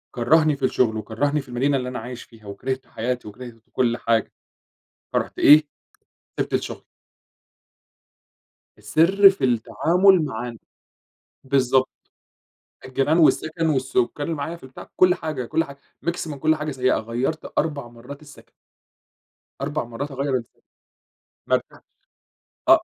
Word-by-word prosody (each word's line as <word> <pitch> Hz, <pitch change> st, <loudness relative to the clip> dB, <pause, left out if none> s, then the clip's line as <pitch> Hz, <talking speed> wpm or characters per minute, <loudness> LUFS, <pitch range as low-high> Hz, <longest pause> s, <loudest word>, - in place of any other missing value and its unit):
كرّهني 155 Hz, +5 st, +3 dB
في 135 Hz, -, -1 dB
الشغل، 115 Hz, -4 st, +1 dB
وكرّهني 140 Hz, +8 st, -1 dB
في 135 Hz, -, -17 dB
المدينة 135 Hz, +3 st, +1 dB
اللي 125 Hz, -1 st, -3 dB
أنا 125 Hz, -, -5 dB
عايش 125 Hz, +1 st, -8 dB
فيها، 110 Hz, -3 st, -17 dB
وكرهت 130 Hz, +7 st, -4 dB
حياتي 120 Hz, 0 st, -3 dB
وكرهت 120 Hz, +3 st, -9 dB
ت 115 Hz, 0 st, -28 dB
كل 120 Hz, -2 st, +1 dB
حاجة، 115 Hz, -2 st, 0 dB, 0.8 s
فرُحت -, -, -2 dB
إيه، 150 Hz, +1 st, +8 dB, 0.8 s
سِبت -, -, -2 dB
الشغل. -, -, -3 dB, 1.9 s
السِرّ 170 Hz, -, +5 dB
في 195 Hz, -, -4 dB
التعامل 170 Hz, -, +3 dB
مع 120 Hz, -2 st, -4 dB
الن 115 Hz, -, -9 dB, 0.9 s
بالضبط، 130 Hz, -1 st, +2 dB, 1.0 s
الجيران 135 Hz, +5 st, +1 dB
والسَكَن 160 Hz, 0 st, +2 dB
والسكّان 130 Hz, -4 st, +1 dB
اللي 165 Hz, +3 st, -1 dB
معايا 155 Hz, +3 st, -4 dB
في -, -, -21 dB
البتاع، 130 Hz, 0 st, -11 dB
كُلّ 180 Hz, -1 st, +5 dB
حاجة، 155 Hz, -6 st, -4 dB
كُلّ 165 Hz, +7 st, +1 dB
حاجة 140 Hz, -2 st, -12 dB, 0.3 s
mix 170 Hz, 0 st, -1 dB
من 145 Hz, -2 st, -6 dB
كل 155 Hz, +2 st, +2 dB
حاجة 155 Hz, 0 st, -4 dB
سيئة، 130 Hz, -2 st, +1 dB
غيّرت 120 Hz, +8 st, -3 dB
4 145 Hz, -6 st, -1 dB
مرّات 125 Hz, +6 st, -11 dB
السكن. 145 Hz, -1 st, -16 dB, 1.1 s
4 145 Hz, +1 st, -2 dB
مرات 120 Hz, +5 st, -6 dB
أغيّر 135 Hz, 0 st, -1 dB
الس 115 Hz, -, -4 dB, 1.0 s
ما -, -, +4 dB
نفَعش، -, -, -14 dB, 0.9 s
آه -, -, +8 dB
135 Hz, 140 wpm, -23 LUFS, 120-155 Hz, 1.9 s, إيه